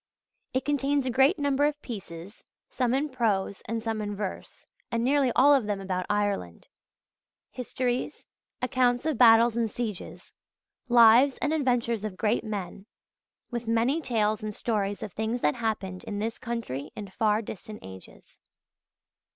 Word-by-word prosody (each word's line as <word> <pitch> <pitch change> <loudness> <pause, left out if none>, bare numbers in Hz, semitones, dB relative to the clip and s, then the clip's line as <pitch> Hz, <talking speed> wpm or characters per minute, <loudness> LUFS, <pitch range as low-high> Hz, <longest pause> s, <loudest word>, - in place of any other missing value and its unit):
It 260 +1 -1
contains 285 -1 +1
a 255 - 0
great 265 +5 +4
number 285 0 +2
of 295 0 -3
pieces, 195 -4 -8 0.2
some 250 -1 0
in 290 +3 0
prose 210 -6 -1
and 225 +1 -3
some 225 -2 -2
in 205 -1 -4
verse, 200 -2 -6 0.3
and 230 0 0
nearly 270 0 +3
all 285 +3 +6
of 260 -7 +2
them 205 -2 -1
about 185 -2 -3
Ireland: 205 - -2 0.8
histories, 250 0 -3 0.4
accounts 250 +1 +1
of 310 -7 -1
battles 230 -1 +6
and 230 -1 0
sieges, 215 -4 -6 0.6
lives 240 +3 +6
and 300 +1 -1
adventures 245 -7 0
of 205 -4 -5
great 220 +2 +1
men, 200 -2 -6 0.6
with 240 -1 -4
many 235 +8 +1
tales 215 -5 0
and 215 -1 -5
stories 205 -3 -2
of 200 - -7
things 220 +3 -2
that 150 - +2
happened 205 -5 -3
in 205 - -4
this 225 +2 -3
country 225 - -4
in 210 -2 -6
far 215 +2 +1
distant 210 +1 -8
ages. 95 0 -13
230 Hz, 150 wpm, -27 LUFS, 205-255 Hz, 0.8 s, all